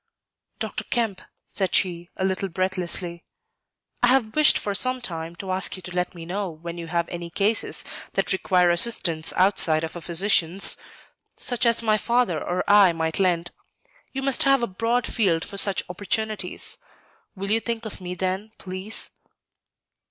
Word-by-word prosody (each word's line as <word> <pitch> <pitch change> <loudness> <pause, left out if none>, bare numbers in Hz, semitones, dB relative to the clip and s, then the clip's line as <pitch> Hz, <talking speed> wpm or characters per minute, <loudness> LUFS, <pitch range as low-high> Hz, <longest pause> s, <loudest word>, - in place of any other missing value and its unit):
"Dr. - - -3
Kemp," 225 -6 -1 0.2
said 190 -2 -2
she, 175 -2 0
a 190 - -1
little 190 0 -1
breathlessly, 180 -1 -2 0.8
"I 245 - +4
have 245 -4 +2
wished 305 -1 +5
for 205 - -2
some 255 +5 +3
time 165 -7 -4
to 190 +2 -6
ask 185 +1 -1
you 185 - -11
to 180 0 -8
let 180 0 -2
me 165 -1 -9
know 190 +2 -3
when 170 +1 -8
you 165 - -7
have 170 0 -1
any 170 -1 -6
cases 205 +6 0 0.3
that - - +1
require 180 -2 +2
assistance 170 -4 +3
outside 175 -4 +3
of 160 - -5
a 175 - -7
physician's, 175 +1 +4 0.6
such 245 -2 0
as 235 0 +3
my 215 -1 +2
father 235 -9 +1
or 180 +1 -2
I 200 -4 +6
might 160 +1 -2
lend. 175 -2 +1 0.6
You 270 0 -4
must 275 +3 +1
have 275 -4 +4
a - - +3
broad 230 +4 -1
field 180 -8 0
for 200 - -8
such 195 -1 +3
opportunities. 210 +4 -1 0.6
Will 195 +1 -4
you 225 - +3
think 230 0 -4
of 215 - -7
me 180 0 -5
then, 190 +4 -3
please?" 185 +3 -5
190 Hz, 165 wpm, -24 LUFS, 175-220 Hz, 0.8 s, I